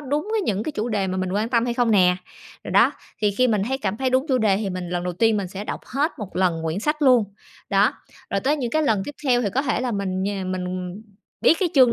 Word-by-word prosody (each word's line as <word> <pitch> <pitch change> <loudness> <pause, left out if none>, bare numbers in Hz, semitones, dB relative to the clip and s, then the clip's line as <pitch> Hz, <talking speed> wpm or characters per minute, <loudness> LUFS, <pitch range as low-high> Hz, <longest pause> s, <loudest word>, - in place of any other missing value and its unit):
đúng 295 +5 -2
với 445 -1 +1
những 210 - -1
cái 310 - -4
chủ 220 -2 -2
đề 205 -4 0
mà 185 0 -2
mình 185 0 -2
quan 215 +3 0
tâm 235 -2 +2
hay 240 -1 -1
không 240 -2 +2
nè. 180 -3 +4 0.5
Rồi - - -6
đó, - - +5 0.3
thì 210 - +4
khi 255 0 +4
mình 210 -3 +1
thấy 265 +1 -1
cảm 210 -6 -2
thấy 260 +2 0
đúng 260 +3 +2
chủ 260 -2 +3
đề 210 -4 +3
thì 200 -1 -2
mình 180 -1 -5
lần 175 0 -2
đầu 180 - -2
tiên 225 +4 +2
mình 195 -3 -2
sẽ 195 +3 -6
đọc - - -4
hết 290 +5 0
một 205 -5 -7
lần 180 -3 +1
quyển 165 +4 -2
sách 300 +5 -1
luôn. 250 -5 +5 0.5
Đó, 200 +6 +4 0.4
rồi 200 - 0
tới 290 +7 +1
những 250 -5 -3
cái 310 +4 +1
lần 220 -9 +2
tiếp 290 - -7
theo 245 -3 +3
thì 210 - 0
có 270 - +2
thể 270 - 0
là 250 -1 -1
mình 190 -2 -2
nh 190 -2 -2
mình, 185 -1 -3
ừm, 180 0 -3
ừm, 180 +3 -6 0.4
biết - - +5
cái 370 - +2
chương 255 -4 +6
215 Hz, 290 wpm, -23 LUFS, 190-260 Hz, 0.5 s, chương